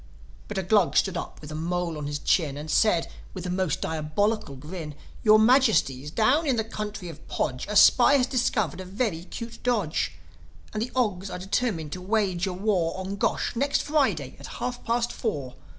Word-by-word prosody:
But -, -, -5 dB
a 190 Hz, -, 0 dB
Glug 195 Hz, -1 st, +3 dB
stood 190 Hz, -2 st, +2 dB
up -, -, -5 dB
with 150 Hz, 0 st, -9 dB
a -, -, -5 dB
mole 170 Hz, +1 st, -2 dB
on 150 Hz, -1 st, -4 dB
his 145 Hz, 0 st, -2 dB
chin, 145 Hz, -1 st, +1 dB
And 150 Hz, +1 st, -5 dB
said, 175 Hz, -5 st, +3 dB, 0.3 s
with 185 Hz, -1 st, -6 dB
a 180 Hz, -, -2 dB
most 185 Hz, -4 st, -1 dB
diabolical 160 Hz, +3 st, -1 dB
grin, 150 Hz, +2 st, -7 dB, 0.3 s
"Your 215 Hz, -1 st, +7 dB
Majesties, 220 Hz, -, +3 dB
down 255 Hz, -, +2 dB
in 265 Hz, -, +3 dB
the 220 Hz, -, 0 dB
country 210 Hz, -3 st, -6 dB
of 165 Hz, -3 st, -11 dB
Podge, 130 Hz, -3 st, -2 dB
A 210 Hz, -, -2 dB
spy 250 Hz, +6 st, +7 dB
has 260 Hz, -3 st, +4 dB
discovered 220 Hz, -, 0 dB
a -, -, -7 dB
very 185 Hz, -3 st, -2 dB
'cute 230 Hz, +4 st, -8 dB
dodge. 180 Hz, -, 0 dB, 0.6 s
And 215 Hz, -, -2 dB
the 235 Hz, -, -3 dB
Ogs 205 Hz, -6 st, 0 dB
are -, -, -5 dB
determined 190 Hz, -4 st, -1 dB
to 180 Hz, -, -5 dB
wage 195 Hz, -2 st, 0 dB
a 185 Hz, -, -2 dB
war 185 Hz, -3 st, 0 dB
On 190 Hz, +1 st, -4 dB
Gosh, 200 Hz, -, -1 dB
next 280 Hz, +4 st, +1 dB
Friday, 295 Hz, -2 st, 0 dB
at -, -, -9 dB
half 245 Hz, 0 st, -4 dB
past 235 Hz, +1 st, 0 dB
four." 140 Hz, -, -3 dB
190 Hz, 195 wpm, -26 LUFS, 160-225 Hz, 0.6 s, Your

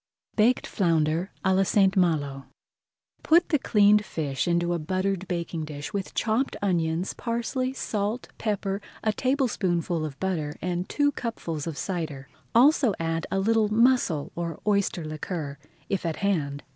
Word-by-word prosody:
BAKED 235 Hz, +3 st, +3 dB
FLOUNDER 165 Hz, -1 st, +1 dB, 0.2 s
À 190 Hz, 0 st, +4 dB
LA 190 Hz, -, +4 dB
ST. 195 Hz, 0 st, +3 dB
MALO 145 Hz, -7 st, +1 dB, 0.8 s
Put 340 Hz, +2 st, +4 dB
the 300 Hz, -, +3 dB
cleaned 210 Hz, -3 st, +4 dB
fish 150 Hz, -8 st, -2 dB
into 175 Hz, 0 st, +1 dB
a 170 Hz, -, -1 dB
buttered 185 Hz, +3 st, -1 dB
baking 170 Hz, -2 st, -3 dB
dish 145 Hz, -1 st, -7 dB
with 195 Hz, -2 st, -4 dB
chopped 230 Hz, +5 st, 0 dB
onions, 170 Hz, -2 st, 0 dB
parsley, 245 Hz, +2 st, -2 dB
salt, 215 Hz, -2 st, -2 dB
pepper, 200 Hz, -2 st, -1 dB, 0.2 s
a 215 Hz, -, +2 dB
tablespoonful 190 Hz, -, 0 dB
of 145 Hz, -3 st, -6 dB
butter 160 Hz, -6 st, -2 dB
and 180 Hz, +1 st, -2 dB
two 290 Hz, -1 st, +2 dB
cupfuls 170 Hz, -, -4 dB
of 160 Hz, -3 st, -4 dB
cider. 160 Hz, -8 st, -4 dB
Add -, -, -29 dB, 0.2 s
also 260 Hz, -2 st, +5 dB
a 165 Hz, 0 st, -1 dB, 0.2 s
little 215 Hz, +1 st, +2 dB
mussel 225 Hz, -, +3 dB
or 170 Hz, -1 st, -4 dB
oyster 200 Hz, -5 st, +1 dB
liquor 155 Hz, -2 st, -5 dB, 0.3 s
if 195 Hz, -, -1 dB
at 165 Hz, -2 st, -1 dB
hand. 150 Hz, -8 st, -1 dB
185 Hz, 145 wpm, -26 LUFS, 160-215 Hz, 0.8 s, also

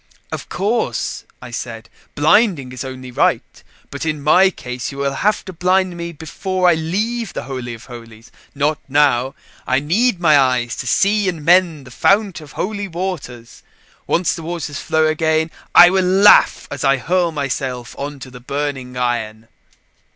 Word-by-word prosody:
"Of -, -, -6 dB
course," 215 Hz, +5 st, -2 dB, 0.2 s
I -, -, -9 dB
said, -, -, -6 dB, 0.3 s
"blinding 175 Hz, -, +3 dB
is 130 Hz, +1 st, -6 dB
only 130 Hz, -1 st, -8 dB
right. -, -, -1 dB, 0.3 s
But -, -, -5 dB
in 155 Hz, -2 st, -2 dB
my 185 Hz, +6 st, +5 dB
case 125 Hz, -8 st, -6 dB
you 135 Hz, -, -10 dB
will 140 Hz, 0 st, -1 dB
have 210 Hz, +9 st, 0 dB
to 190 Hz, -, -8 dB
blind 185 Hz, +1 st, +1 dB
me 170 Hz, 0 st, -5 dB
before 180 Hz, +4 st, -2 dB
I 175 Hz, -, +6 dB
leave 205 Hz, +8 st, -2 dB
the -, -, -5 dB
Holy 125 Hz, -3 st, -6 dB
of 115 Hz, -, -14 dB
Holies, 115 Hz, -2 st, -12 dB, 0.2 s
not 150 Hz, +1 st, 0 dB
now. 135 Hz, -2 st, +2 dB, 0.3 s
I 130 Hz, -, +2 dB
need 185 Hz, -, +1 dB
my 155 Hz, -4 st, +5 dB
eyes 125 Hz, -3 st, +1 dB
to 125 Hz, -, -5 dB
see 200 Hz, -, +2 dB
and 160 Hz, -4 st, -6 dB
mend 170 Hz, -5 st, +3 dB
the 130 Hz, -, -13 dB
Fount 195 Hz, -, +1 dB
of 150 Hz, -2 st, -13 dB
Holy 205 Hz, +1 st, -3 dB
Waters. 165 Hz, -10 st, -6 dB, 0.5 s
Once 175 Hz, 0 st, +1 dB
the 165 Hz, -, -7 dB
waters 160 Hz, -3 st, -5 dB
flow 160 Hz, 0 st, +1 dB
again, 160 Hz, +1 st, +1 dB, 0.2 s
I 175 Hz, 0 st, +9 dB
will 190 Hz, 0 st, +2 dB
laugh 190 Hz, +3 st, +5 dB
as -, -, -5 dB
I 135 Hz, 0 st, +3 dB
hurl 175 Hz, +5 st, 0 dB
myself 135 Hz, -4 st, -4 dB
on 145 Hz, +1 st, -6 dB
the 130 Hz, -1 st, -11 dB
burning 135 Hz, -1 st, -4 dB
iron." 115 Hz, -3 st, -3 dB
155 Hz, 165 wpm, -18 LUFS, 130-180 Hz, 0.5 s, I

